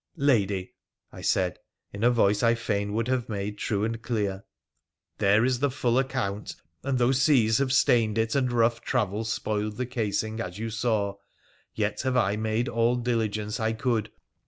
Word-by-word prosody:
' - - -53 0.2
Lady,' 95 -4 -1 0.4
I - - -10
said 90 -3 0 0.3
in 100 +2 -5
a 120 - +6
voice 105 -4 +3
I 115 0 +4
fain 105 -3 -2
would 115 +2 -1
have 125 -2 -1
made 105 0 -4
true 105 -1 -1
and 115 +1 -2
clear, 105 -5 -2 0.4
* 85 +1 -57
there 105 +3 +4
is 125 -1 +1
the 145 +1 +2
full 125 -2 +1
account, 110 -6 -2 0.3
and 135 -1 -1
though 125 +1 +3
seas 130 -4 +3
have 135 -2 +1
stained 115 -5 +3
it, 110 0 +1
and 130 -3 +1
rough 115 -1 +2
travel 110 -4 -1
spoiled 105 -1 -2
the 125 - -1
casing, 110 -2 -2
as 90 -4 -6
you 115 +1 -4
saw, 105 -3 -1 0.6
yet 105 -1 -1
have 130 -1 0
I 100 -4 +2
made 110 +3 -1
all 115 +1 +2
diligence 110 -3 -1
I 110 0 0
could. 115 -2 -1
110 Hz, 180 wpm, -27 LUFS, 105-120 Hz, 0.6 s, a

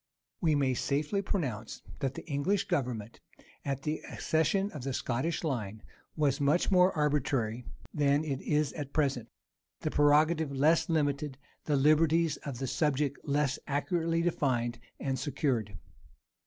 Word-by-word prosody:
We 160 -4 +3
may 135 -2 +2
safely 150 - 0
pronounce 130 - -3 0.2
that 135 -1 -2
the - - -8
English 170 +7 0
government, 120 -5 -2 0.4
at 135 -1 -3
the 155 +1 -2
accession 195 +6 +1
of 145 -5 -7
the 135 0 -2
Scottish 130 +9 -1
line, 110 -8 -3 0.3
was 145 -3 +1
much 150 +8 +2
more 180 0 +5
arbitrary 135 -6 0 0.3
than 145 0 +2
it 140 -4 -3
is 150 -1 0
at 145 -3 -6
present; 140 -6 0 0.5
the - - -1
prerogative 150 +1 +3
less 155 +6 +3
limited, 145 -3 0 0.3
the 150 - +1
liberties 155 +2 +3
of 140 -4 -6
the 135 - -3
subject 145 +1 0
less 140 -2 +1
accurately 165 +3 0
defined 120 -8 0 0.2
and 135 -2 -2
secured. 125 - -1
145 Hz, 140 wpm, -30 LUFS, 135-155 Hz, 0.5 s, more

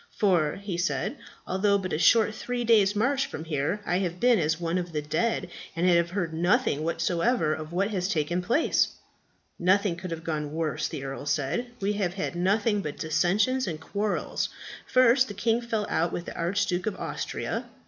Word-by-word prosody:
"For," 175 -7 +2
he 195 -3 -5
said, 180 - -1 0.3
"although 200 +2 +2
but 185 -2 -4
a 150 - 0
short 220 +3 +5
three 245 +2 -3
days' 215 -3 +4
march 270 +6 +1
from 155 - -6
here, 155 +6 -1
I 180 - +1
have 180 -2 -2
been 245 -3 +4
as 160 0 0
one 170 +1 0
of 175 -2 -6
the 150 - -1
dead, 165 +10 -1 0.2
and 170 +2 0
have 170 -1 +4
heard 175 -3 -2
nothing 175 - +2
whatever 170 +2 +1
of 155 0 -6
what 195 +5 0
has 185 -2 -1
taken 170 +2 0
place." 235 - +2 0.7
"Nothing 185 +1 +3
could 180 +2 -7
have 165 -1 -5
gone 150 -2 -3
worse," 160 -2 -1
the 135 - -6
earl 135 +1 -6
said. 150 - 0
"We 200 0 0
have 190 -3 -1
had 190 -2 -3
nothing 205 +4 +1
but 150 -5 -5
dissensions 195 +11 +1
and 160 -3 -3
quarrels. 200 +6 -2 0.4
First, 255 +1 +5
the 205 - -7
king 225 +3 +1
fell 225 -3 -2
out 170 +1 0
with 175 - -4
the - - -7
Archduke 180 +1 0
of 210 - -1
Austria." - - -4
185 Hz, 190 wpm, -27 LUFS, 165-210 Hz, 0.7 s, short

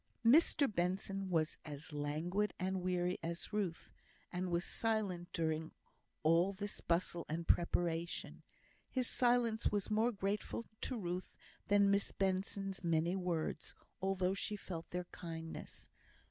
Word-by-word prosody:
Mr 285 +3 +7
Benson 195 0 -1
was 160 -3 +1
as 150 0 -7
languid 160 +8 0
and 190 0 0
weary 180 0 0
as 170 +5 -3
Ruth, 195 -6 -2 0.4
and 180 +1 -1
was 175 0 +1
silent 205 -6 -1
during 160 -1 -1 0.5
all 170 +5 +4
this 205 +1 -4
bustle 170 0 0
and 165 +2 -2
preparation. 170 0 +1 0.5
His 255 -2 0
silence 240 -2 +3
was 205 0 -1
more 220 +3 +3
grateful 205 +2 -2 0.2
to 255 - -2
Ruth 180 -2 -4 0.3
than 200 -1 +5
Miss 200 0 +2
Benson's 195 0 -1
many 170 +1 +2
words, 170 -4 -2 0.3
although 190 -1 +1
she 210 +1 -2
felt 175 -5 -6
their 180 0 -3
kindness. 165 -1 -6
185 Hz, 130 wpm, -37 LUFS, 170-200 Hz, 0.5 s, Mr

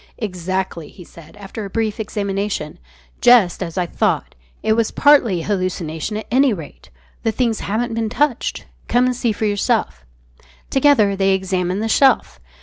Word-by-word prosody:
"Exactly," 185 -4 -4
he 180 - -13
said, 170 +3 -16
after 205 +2 -7
a 200 - -6
brief 220 +1 -2
examination; 200 -6 -3 0.4
"just 235 -9 +5
as 170 -1 -5
I 180 - +1
thought. - - -1 0.3
It 220 - +3
was 225 0 +1
partly 235 - +4
hallucination, 185 -1 -3
at 215 - -6
any 265 0 +4
rate. 165 -7 -10 0.3
The 225 - 0
things 230 -1 0
haven't 230 +3 -2
been 225 -1 -1
touched. 280 +1 -1 0.2
Come 245 +1 +3
and 255 0 0
see 235 -1 0
for 215 +1 -2
yourself." 200 - 0 0.7
Together 270 -8 +4
they 195 0 +2
examined 185 +1 -2
the - - -1
shelf. 265 - +3
205 Hz, 155 wpm, -19 LUFS, 185-230 Hz, 0.7 s, just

